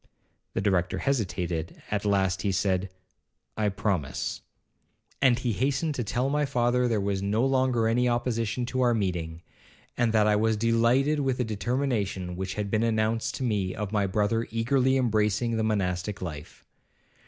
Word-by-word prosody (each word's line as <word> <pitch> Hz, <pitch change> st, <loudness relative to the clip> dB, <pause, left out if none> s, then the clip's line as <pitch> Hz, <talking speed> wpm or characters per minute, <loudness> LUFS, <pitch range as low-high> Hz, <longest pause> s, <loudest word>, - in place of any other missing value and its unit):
The -, -, 0 dB
Director 95 Hz, -2 st, +1 dB
hesitated, 90 Hz, -, -2 dB
at 105 Hz, 0 st, -1 dB
last 95 Hz, -2 st, +1 dB
he 100 Hz, -, 0 dB
said, 95 Hz, 0 st, 0 dB, 0.7 s
'I 105 Hz, -1 st, +1 dB
promise.' 95 Hz, -8 st, -2 dB, 0.8 s
And 130 Hz, -3 st, +5 dB
he 125 Hz, -2 st, -1 dB
hastened 140 Hz, -, 0 dB
to 125 Hz, -, -2 dB
tell 120 Hz, +5 st, -1 dB
my 150 Hz, +2 st, +1 dB
father 125 Hz, -2 st, +1 dB
there 115 Hz, -3 st, +1 dB
was 100 Hz, -1 st, -1 dB
no 105 Hz, +5 st, +1 dB
longer 130 Hz, -4 st, +2 dB
any 125 Hz, +2 st, +2 dB
opposition 120 Hz, 0 st, -1 dB
to 130 Hz, +1 st, -2 dB
our 120 Hz, -2 st, +3 dB
meeting, 85 Hz, -5 st, -2 dB, 0.5 s
and 120 Hz, -2 st, +1 dB
that 110 Hz, -1 st, +3 dB
I 105 Hz, 0 st, +4 dB
was 110 Hz, 0 st, +2 dB
delighted 115 Hz, +6 st, +2 dB
with 135 Hz, -3 st, 0 dB
the 125 Hz, -, +1 dB
determination 110 Hz, -5 st, -2 dB
which 95 Hz, 0 st, -4 dB
had 105 Hz, -1 st, -3 dB
been 110 Hz, -, +2 dB
announced 115 Hz, 0 st, 0 dB
to -, -, -4 dB
me 100 Hz, -6 st, -1 dB
of 105 Hz, -1 st, -4 dB
my 100 Hz, -2 st, +1 dB
brother 105 Hz, +3 st, 0 dB
eagerly 130 Hz, +4 st, +2 dB
embracing 110 Hz, -1 st, +1 dB
the 110 Hz, -, 0 dB
monastic 100 Hz, -2 st, -1 dB
life. 75 Hz, -5 st, -8 dB
110 Hz, 165 wpm, -27 LUFS, 100-125 Hz, 0.8 s, And